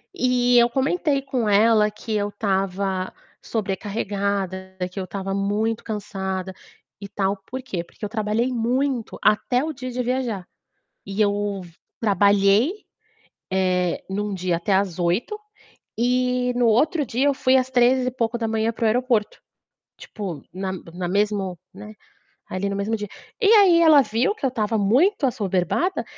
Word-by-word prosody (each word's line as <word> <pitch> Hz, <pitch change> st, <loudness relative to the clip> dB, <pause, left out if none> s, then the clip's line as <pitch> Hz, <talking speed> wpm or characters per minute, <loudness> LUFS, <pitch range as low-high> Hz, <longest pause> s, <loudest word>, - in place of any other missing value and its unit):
E 245 Hz, -3 st, +3 dB
eu 235 Hz, 0 st, +6 dB
comentei 280 Hz, +2 st, 0 dB
com 260 Hz, -5 st, -2 dB
ela 210 Hz, +1 st, +4 dB
que 215 Hz, +1 st, -5 dB
eu 205 Hz, 0 st, 0 dB
estava 195 Hz, -2 st, -1 dB, 0.3 s
sobrecarregada, 195 Hz, -2 st, -3 dB
que 195 Hz, -, -6 dB
eu 190 Hz, -, -2 dB
estava 195 Hz, +1 st, -4 dB
muito 210 Hz, +3 st, -1 dB
cansada, 190 Hz, -3 st, -4 dB, 0.5 s
e 200 Hz, -, -6 dB
tal. 195 Hz, 0 st, -1 dB
Por 260 Hz, +1 st, -6 dB
quê? 190 Hz, -9 st, -4 dB
Porque 175 Hz, -, -20 dB
eu -, -, -5 dB
trabalhei 215 Hz, +2 st, 0 dB
muito 245 Hz, +1 st, -1 dB
até 245 Hz, +4 st, +2 dB
o 315 Hz, 0 st, -3 dB
dia 255 Hz, -3 st, -6 dB
de 250 Hz, +1 st, -2 dB
viajar. 245 Hz, -6 st, -2 dB, 0.6 s
E 195 Hz, +2 st, -4 dB
eu 205 Hz, -1 st, 0 dB, 0.4 s
trabalhei, 200 Hz, -, +3 dB, 0.8 s
eh, 180 Hz, -2 st, +1 dB
em 195 Hz, +2 st, -2 dB
um 210 Hz, 0 st, -3 dB
dia 180 Hz, -2 st, -1 dB
até 190 Hz, +3 st, 0 dB
às 190 Hz, -3 st, 0 dB
20h, 180 Hz, -, 0 dB, 0.6 s
e 250 Hz, +1 st, +1 dB
no 245 Hz, -1 st, +2 dB
outro 290 Hz, +8 st, +3 dB
dia 255 Hz, +3 st, 0 dB
eu 285 Hz, -, +3 dB
fui 260 Hz, 0 st, +3 dB
às 260 Hz, 0 st, +1 dB
3 250 Hz, +1 st, +3 dB
e -, -, +1 dB
pouco 235 Hz, -2 st, -2 dB
da 230 Hz, -, -1 dB
manhã 225 Hz, +1 st, 0 dB
para 230 Hz, -, -3 dB
o -, -, +4 dB
aeroporto. 235 Hz, -1 st, +1 dB, 0.6 s
Tipo, 185 Hz, -9 st, -7 dB
na 190 Hz, +1 st, -3 dB, 0.2 s
na 180 Hz, 0 st, -3 dB
mesmo 200 Hz, -1 st, 0 dB, 0.2 s
né, 210 Hz, +3 st, -10 dB, 0.6 s
ali 185 Hz, +2 st, -2 dB
no 200 Hz, -, -3 dB
mesmo 200 Hz, +3 st, -1 dB
dia. 210 Hz, -1 st, -5 dB, 0.3 s
E 405 Hz, -, +4 dB
aí 385 Hz, -6 st, +6 dB
ela 310 Hz, -3 st, +7 dB
viu 245 Hz, -, 0 dB
que 360 Hz, -, -4 dB
eu -, -, +3 dB
estava 225 Hz, -2 st, -1 dB
muito 275 Hz, -, +3 dB
assoberbada, 205 Hz, -, 0 dB
215 Hz, 160 wpm, -23 LUFS, 195-250 Hz, 0.8 s, ela